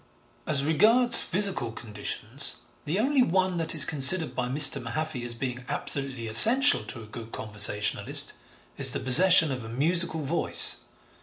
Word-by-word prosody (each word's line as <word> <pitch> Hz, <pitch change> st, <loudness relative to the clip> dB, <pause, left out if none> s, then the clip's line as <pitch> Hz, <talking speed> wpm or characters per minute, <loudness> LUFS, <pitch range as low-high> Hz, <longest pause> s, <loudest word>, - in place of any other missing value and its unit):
As 140 Hz, -2 st, 0 dB
regards 230 Hz, +10 st, +1 dB
physical 185 Hz, -, -3 dB
conditions, 110 Hz, +4 st, -8 dB, 0.3 s
the 155 Hz, +5 st, -5 dB
only 265 Hz, +5 st, -2 dB
one 185 Hz, -3 st, -3 dB
that 165 Hz, 0 st, -4 dB
is 155 Hz, -2 st, +4 dB
considered 155 Hz, +4 st, 0 dB
by 125 Hz, -1 st, -5 dB
Mr. 145 Hz, +3 st, +5 dB
Mahaffy 125 Hz, +3 st, -8 dB
as 120 Hz, -1 st, -3 dB
being 125 Hz, 0 st, -8 dB
absolutely 135 Hz, -4 st, -3 dB
essential 235 Hz, -, +5 dB
to 115 Hz, -3 st, -11 dB
a -, -, -15 dB
good 115 Hz, +1 st, -13 dB
conversationalist, 105 Hz, -1 st, -1 dB, 0.5 s
is -, -, +4 dB
the -, -, -5 dB
possession 160 Hz, +3 st, +5 dB
of 125 Hz, -3 st, -8 dB
a 110 Hz, -, -12 dB
musical 160 Hz, +5 st, -1 dB
voice. 155 Hz, +5 st, 0 dB
140 Hz, 150 wpm, -23 LUFS, 120-175 Hz, 0.5 s, Mr